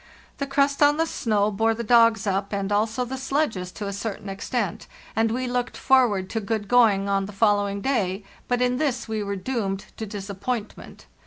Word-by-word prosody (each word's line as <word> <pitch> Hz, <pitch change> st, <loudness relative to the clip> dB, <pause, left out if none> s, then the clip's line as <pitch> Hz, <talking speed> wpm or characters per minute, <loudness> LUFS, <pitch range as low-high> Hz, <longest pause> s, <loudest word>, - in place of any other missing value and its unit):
The 280 Hz, -, -2 dB
crust 280 Hz, +1 st, +1 dB
on 290 Hz, 0 st, +5 dB
the 325 Hz, -, +2 dB
snow 215 Hz, -8 st, 0 dB
bore 225 Hz, +2 st, +1 dB
the 235 Hz, -, -4 dB
dogs 230 Hz, -1 st, +4 dB
up, 195 Hz, 0 st, -1 dB
and 200 Hz, 0 st, -2 dB
also 220 Hz, +4 st, +1 dB
the 260 Hz, +2 st, -5 dB
sledges 265 Hz, -10 st, -1 dB
to 210 Hz, -, -6 dB
a 200 Hz, -, -3 dB
certain 200 Hz, 0 st, -5 dB
extent, 195 Hz, 0 st, -3 dB, 0.3 s
and 225 Hz, +1 st, +2 dB
we 255 Hz, +3 st, -1 dB
looked 245 Hz, 0 st, -2 dB
forward 240 Hz, -8 st, +3 dB
to 225 Hz, -, -1 dB
good 210 Hz, 0 st, -2 dB
going 215 Hz, -4 st, +4 dB
on 195 Hz, -1 st, 0 dB
the -, -, -8 dB
following 205 Hz, -1 st, +1 dB
day; 200 Hz, -6 st, 0 dB, 0.2 s
but 245 Hz, 0 st, +1 dB
in 250 Hz, 0 st, +1 dB
this 260 Hz, -6 st, -1 dB
we 220 Hz, -1 st, -2 dB
were 200 Hz, -1 st, -3 dB
doomed 195 Hz, -2 st, -3 dB
to 220 Hz, -, -5 dB
disappointment. 205 Hz, +3 st, -5 dB
220 Hz, 190 wpm, -24 LUFS, 200-250 Hz, 0.3 s, on